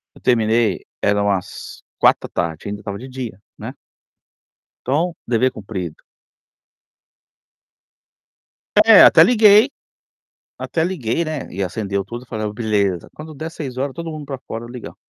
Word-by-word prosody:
Eu -, -, -17 dB
terminei, 115 Hz, -4 st, +1 dB, 0.2 s
era 100 Hz, 0 st, +2 dB
umas 100 Hz, -3 st, -3 dB, 0.2 s
16:00, 80 Hz, 0 st, 0 dB
ainda, 105 Hz, 0 st, -5 dB
estava 100 Hz, -1 st, -5 dB
de 125 Hz, +5 st, -9 dB
dia, 125 Hz, -6 st, -7 dB, 0.2 s
né. -, -, -7 dB, 1.1 s
Então, 160 Hz, +7 st, 0 dB
dever 125 Hz, +2 st, +2 dB
cumprido. 95 Hz, -6 st, -7 dB, 2.8 s
É, 225 Hz, -2 st, +9 dB
até -, -, +8 dB
liguei, 220 Hz, 0 st, +6 dB, 0.9 s
até 160 Hz, -, -1 dB
liguei, 170 Hz, -4 st, -1 dB
né, 155 Hz, -3 st, -5 dB
e 100 Hz, -, -3 dB
acendeu 100 Hz, +1 st, -2 dB
tudo, 120 Hz, +5 st, -8 dB
e -, -, -29 dB
falei: 110 Hz, -2 st, -3 dB
"Beleza, 105 Hz, -5 st, -1 dB
quando 155 Hz, 0 st, -10 dB
der 160 Hz, +3 st, -6 dB
18:00, 135 Hz, -3 st, -5 dB
todo 170 Hz, -1 st, -6 dB
mundo 155 Hz, -2 st, -7 dB
para 135 Hz, -2 st, -6 dB
fora 115 Hz, +1 st, -6 dB
ligar". 120 Hz, 0 st, -9 dB
120 Hz, 130 wpm, -20 LUFS, 100-155 Hz, 2.8 s, É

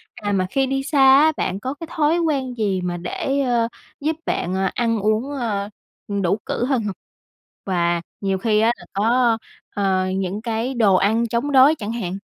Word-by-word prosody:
À, 210 Hz, -3 st, -3 dB
mà 190 Hz, -2 st, +1 dB
khi 270 Hz, +6 st, +1 dB
đi 270 Hz, 0 st, -1 dB
xa 285 Hz, 0 st, 0 dB
á, 270 Hz, +4 st, +7 dB
bạn 190 Hz, +1 st, -2 dB
có 260 Hz, +5 st, -4 dB
cái 325 Hz, +3 st, -9 dB
thói 315 Hz, +1 st, +2 dB
quen 280 Hz, -6 st, -1 dB
gì 200 Hz, -4 st, 0 dB
mà 175 Hz, -1 st, -3 dB
để, 270 Hz, +10 st, -2 dB
ơ, 240 Hz, -3 st, +1 dB, 0.3 s
giúp 310 Hz, +3 st, -1 dB
bạn, 180 Hz, -, -1 dB
ờ, 190 Hz, 0 st, +1 dB
ăn 230 Hz, -2 st, 0 dB
uống, 215 Hz, +6 st, 0 dB
ơ, 215 Hz, -7 st, -2 dB, 0.4 s
ừ, 200 Hz, -1 st, -2 dB
đủ 185 Hz, +2 st, +1 dB
cữ 240 Hz, -, -1 dB
hơn 260 Hz, -3 st, 0 dB
hông? 205 Hz, -2 st, -3 dB, 0.7 s
Và 175 Hz, -2 st, 0 dB, 0.2 s
nhiều 195 Hz, -1 st, 0 dB
khi 215 Hz, +1 st, +1 dB
á 225 Hz, +2 st, +4 dB
là -, -, -13 dB
có, 230 Hz, +3 st, +2 dB, 0.4 s
ờ, 190 Hz, -2 st, +1 dB
những 195 Hz, +2 st, -2 dB
cái 230 Hz, +2 st, -2 dB
đồ 215 Hz, -6 st, +4 dB
ăn 220 Hz, +5 st, +2 dB
chống 235 Hz, +6 st, -1 dB
đói 275 Hz, +3 st, +6 dB
chẳng 210 Hz, -1 st, -4 dB
hạn? 195 Hz, -6 st, -4 dB
225 Hz, 200 wpm, -21 LUFS, 195-265 Hz, 0.7 s, á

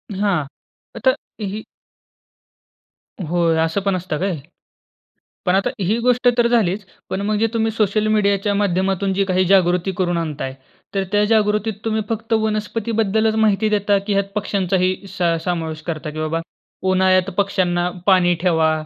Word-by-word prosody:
हां. 190 Hz, -7 st, +1 dB, 0.5 s
आता -, -, +2 dB, 0.3 s
ही 210 Hz, +1 st, -4 dB, 1.7 s
होय 170 Hz, -1 st, +2 dB
असं 165 Hz, +5 st, -1 dB
पण 195 Hz, -1 st, 0 dB
असतं 180 Hz, -4 st, -3 dB
काय? 185 Hz, -3 st, -1 dB, 1.1 s
पण 180 Hz, -, +3 dB
आता 195 Hz, -, +2 dB
ही 205 Hz, +4 st, +1 dB
गोष्ट 250 Hz, +1 st, +2 dB
तर 235 Hz, 0 st, +4 dB
झालीच 210 Hz, -4 st, +1 dB, 0.3 s
पण 195 Hz, -, -2 dB
मग 215 Hz, 0 st, +1 dB
जे 225 Hz, -, +3 dB
तुम्ही 225 Hz, -1 st, +1 dB
सोशल 215 Hz, 0 st, +1 dB
मीडियाच्या 205 Hz, -1 st, +2 dB
माध्यमातून 195 Hz, 0 st, 0 dB
जी 195 Hz, +1 st, +1 dB
काही 185 Hz, -1 st, +1 dB
जागृती 180 Hz, -1 st, +3 dB
करून 175 Hz, -2 st, 0 dB
आणताय, 150 Hz, -5 st, -4 dB, 0.4 s
तर 195 Hz, -, +1 dB
त्या 205 Hz, 0 st, +3 dB
जागृतीत 215 Hz, 0 st, +2 dB
तुम्ही 220 Hz, 0 st, 0 dB
फक्त 225 Hz, 0 st, -2 dB
वनस्पतीबद्दलच 220 Hz, 0 st, 0 dB
माहिती 215 Hz, -1 st, +2 dB
देता 205 Hz, -1 st, +2 dB
की 205 Hz, -, +1 dB
ह्यात 200 Hz, 0 st, +1 dB
पक्ष्यांचाही 185 Hz, -2 st, 0 dB
स 185 Hz, 0 st, -9 dB, 0.2 s
समावेश 160 Hz, -3 st, -2 dB
करता, 155 Hz, -1 st, -3 dB
की 155 Hz, -, -7 dB
बाबा 155 Hz, +1 st, -1 dB, 0.5 s
उन्हाळ्यात 185 Hz, 0 st, +3 dB
पक्ष्यांना 180 Hz, -3 st, +1 dB, 0.2 s
पाणी 180 Hz, -2 st, +4 dB
ठेवा 160 Hz, -3 st, +3 dB
195 Hz, 145 wpm, -20 LUFS, 180-215 Hz, 1.7 s, तर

